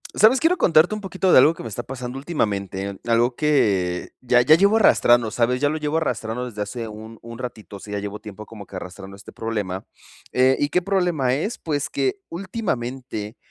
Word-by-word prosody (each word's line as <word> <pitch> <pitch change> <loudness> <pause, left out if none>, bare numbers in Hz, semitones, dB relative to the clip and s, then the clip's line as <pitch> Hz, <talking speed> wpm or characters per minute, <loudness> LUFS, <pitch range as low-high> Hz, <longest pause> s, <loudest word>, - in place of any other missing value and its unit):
¿Sabes? 225 +6 +5
Quiero 335 +3 +2
contarte 170 +4 +4
un 215 - -6
poquito 190 -1 0
de - - +7
algo 150 +5 +7
que - - -10
me 115 - -6
está 115 +3 -5
pasando 125 0 -6
últimamente. 100 - -3
Algo 120 +1 +2
que 100 - +1
ya 125 0 +4
ya 155 +6 +6
llevo 200 +5 +4
arrastrando, 120 - +4
¿sabes? 125 +3 0
ya 145 - +3
lo 155 - -2
llevo 150 0 -1
arrastrando 125 -6 -2
desde 105 -4 -4
hace 115 +2 -6
un 110 +1 -10
un 115 0 -10
ratito. 110 -6 -8
Sí, 105 - -10
ya 105 - -2
llevo 100 +1 -6
tiempo 110 -1 -10
como 105 -3 -10
que 95 - -13
arrastrando 95 +1 -8
este 100 - -13
problema, 105 -5 -4 0.5
eh, 130 +1 +4
¿y 145 - +1
qué 180 - +1
problema 175 -9 +1
es? 205 - -3
Pues, 145 -3 -2
que 390 0 0
últimamente 130 - -4
125 Hz, 200 wpm, -22 LUFS, 105-155 Hz, 0.5 s, de